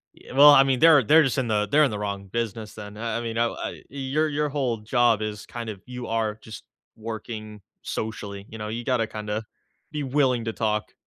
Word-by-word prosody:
Y - - -15
well, 145 +2 +9
I 135 -2 +8
mean, 135 -2 +1
they're 160 -3 +7
they're 155 +8 +6
just 135 -2 0
in 130 -3 0
the 105 -1 +1
they're 150 +2 +5
in 140 - +2
the 105 - -4
wrong 100 -1 -4
business 110 +1 -4
then, 105 -1 -9
I 115 0 -2
I - - -3
mean, 115 -1 -4
I 115 - +3
w - - -7
I - - -5
your 140 +3 -1
your 150 0 0
whole 135 -5 -1
job 115 0 +2
is 105 -1 -4
kind 115 -2 -6
of 100 -3 -7
you 125 -1 -7
are 110 -2 -1
just 110 0 -10 0.3
working 110 -1 -7 0.2
socially, 100 -2 -5
you 110 - -9
know? 105 0 -5
You 115 +2 -4
gotta 120 -4 +1
kinda 105 0 -4 0.5
be 150 -1 -3
willing 130 -3 +1
to 115 - -2
talk. 105 -2 -1
115 Hz, 230 wpm, -25 LUFS, 105-130 Hz, 0.5 s, well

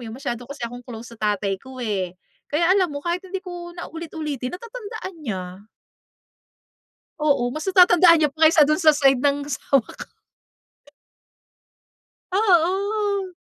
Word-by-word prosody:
'yon, 220 - -8
masyado 245 -3 -5
kasi 280 -3 -6
akong 245 +1 -7
close 235 -1 -10
sa 225 - -15 0.2
tatay 195 -1 -3
ko 260 0 -12
eh. 185 -4 -3 0.3
Kaya 335 +4 +2
alam 380 -2 +3
mo, 285 -1 -7
kahit 345 +1 -1
hindi 380 +1 -7
ko 350 -1 -7
na 345 - -6
ulit-ulitin, 310 -4 -5
natatandaan 445 -3 -8
niya. 185 -8 -6 1.6
Oo, 280 -5 +1
mas 310 +7 -6
natatandaan 355 -3 +6
niya 300 - +3
pa, 315 +2 +3
kaysa 315 -1 +6
do'n 305 - +2
sa 310 -3 +5
side 270 -3 +4
ng, 285 +2 +1
asawa 275 -1 +1
ko. - - -11 2.2
Oo. 395 +1 +1
310 Hz, 145 wpm, -22 LUFS, 250-360 Hz, 2.2 s, natatandaan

